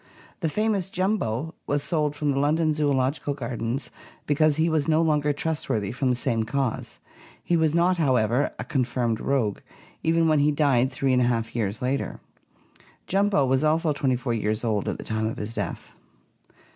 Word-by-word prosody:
The 165 - 0
famous 210 0 0
"Jumbo" 170 - -1
was 145 0 0
sold 150 -2 0
from 145 -1 0
the 135 - 0
London 155 +2 +2
Zoological 145 -1 0
Gardens 120 0 -4 0.3
because 150 0 +3
he 160 +2 +2
was 155 -3 +1
no 160 -1 +3
longer 150 -2 +2
trustworthy 145 -9 -2
from 130 +1 -1
the 125 - +2
same 120 -3 0
cause. 130 +1 -2 0.5
He 175 - +1
was 160 -1 +2
not, 175 +2 +3
however, 130 -3 +2
a - - -4
con 135 -3 0
firmed 120 -2 -1
rogue, 125 -7 0 0.4
even 165 0 +2
when 155 -2 +3
he 145 +1 +3
died 140 -4 +2
three 130 0 0
and 125 - +3
a - - +3
half 115 -2 -1
years 110 -1 -2
later. 130 +2 -2 0.9
"Jumbo" 195 -6 +2
was 130 +2 +1
also 155 0 +2
twenty 135 -2 +1
four 120 -1 -2
years 110 0 -1
old 110 -4 0
at - - -3
the - - -7
time 110 0 -1
of 110 - -4
his 105 +2 -5
death. - - -5
140 Hz, 185 wpm, -25 LUFS, 120-155 Hz, 0.9 s, because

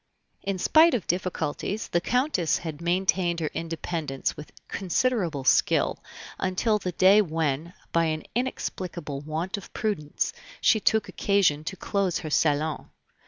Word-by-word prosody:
In 195 -1 -2
spite 320 - +5
of 215 - -2
difficulties, 185 +3 -2
the 175 - +1
Countess 250 - +1
had 160 -2 -6
maintained 175 0 +1
her 155 -2 -2
independence 160 -4 -3
with 150 - -10 0.2
considerable 185 - 0
skill - - +3 0.4
until 210 +4 +1
the 180 -3 -4
day 190 +5 +6
when, 160 -2 -1 0.2
by 170 0 +3
an 155 -1 -1
inexplicable 180 - -3
want 160 +6 -3
of 200 - -10
prudence, 170 -10 -2 0.3
she 220 - +4
took 220 0 +2
occasion 190 -7 +2
to 180 - -4
close 195 -3 0
her 160 -4 -6
salon. 150 0 +1
175 Hz, 135 wpm, -26 LUFS, 155-200 Hz, 0.4 s, day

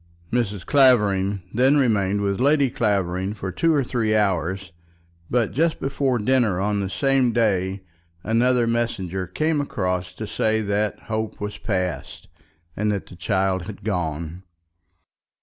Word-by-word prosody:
Mrs. 105 -7 -1
Clavering 105 -8 +3
then 130 +5 +4
remained 105 -6 +2
with 100 -1 -1
Lady 140 0 +3
Clavering 100 -3 0
for 95 -2 -5
two 165 - +1
or 145 -3 +2
three 115 -3 0
hours; 95 -2 0 0.6
but 120 -3 +1
just 160 +3 +1
before 135 -2 0
dinner 115 -4 +2
on 100 +1 0
the 95 -1 -2
same 125 +6 +2
day 95 -4 0 0.4
another 120 +2 +2
messenger 95 -6 -2
came 155 - 0
across 90 -8 -2
to 110 - -5
say 110 +1 0
that 105 0 -1
hope 110 0 -4
was 105 0 -5
past, 90 -6 -3 0.5
and 105 +1 0
that 100 -2 -3
the - - -13
child 95 -1 0
had 105 -3 -9
gone. 85 -4 -3
105 Hz, 140 wpm, -23 LUFS, 95-120 Hz, 0.6 s, then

